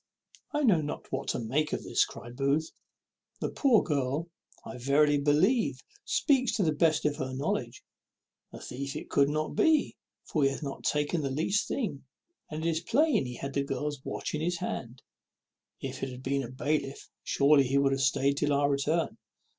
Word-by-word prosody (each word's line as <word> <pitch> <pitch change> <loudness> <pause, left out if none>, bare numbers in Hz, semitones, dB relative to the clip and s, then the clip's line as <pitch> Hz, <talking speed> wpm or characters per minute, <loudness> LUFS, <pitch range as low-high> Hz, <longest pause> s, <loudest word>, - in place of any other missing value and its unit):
"I 295 0 0
know 195 - +4
not 145 0 -6
what - - -3
to - - -1
make 135 +7 -1
of - - -2
this," - - +2
cries 120 - -10
Booth. 140 +5 0 0.7
"The - - -1
poor 255 -6 +4
girl, 145 +2 -1 0.3
I 125 - -7
verily 145 +3 +3
believe, 175 - +2 0.2
speaks 260 -5 +2
to 210 - +1
the 160 - +2
best 155 +1 +2
of 145 -1 +1
her 130 0 -4
knowledge. 135 - -2 0.7
A - - -9
thief 135 +2 -6
it - - -7
could 140 0 +4
not 155 +1 -1
be, 320 -2 +2 0.3
for 155 - -1
he 135 - +5
hath 135 - -5
not 140 -1 -6
taken 150 +3 +1
the 140 - -1
least 165 +9 0
thing; 200 - -3 0.5
and 155 +1 -4
it - - +3
is 160 - 0
plain 260 - +2
he 125 - -6
had 140 +2 -5
the 140 - +1
girl's 145 0 -3
watch - - -4
in 155 - -2
his 175 +2 0
hand. 120 -5 -5 0.8
If 130 -1 -5
it 135 - -2
had 125 0 -9
been 140 +1 0
a 120 - -6
bailiff, 140 +1 -2 0.2
surely 140 0 +4
he 135 +2 +1
would 140 -1 +3
have 135 0 0
staid 135 +1 +2
till 145 0 +1
our 140 0 +2
return. 150 +4 0
145 Hz, 195 wpm, -29 LUFS, 135-160 Hz, 0.8 s, he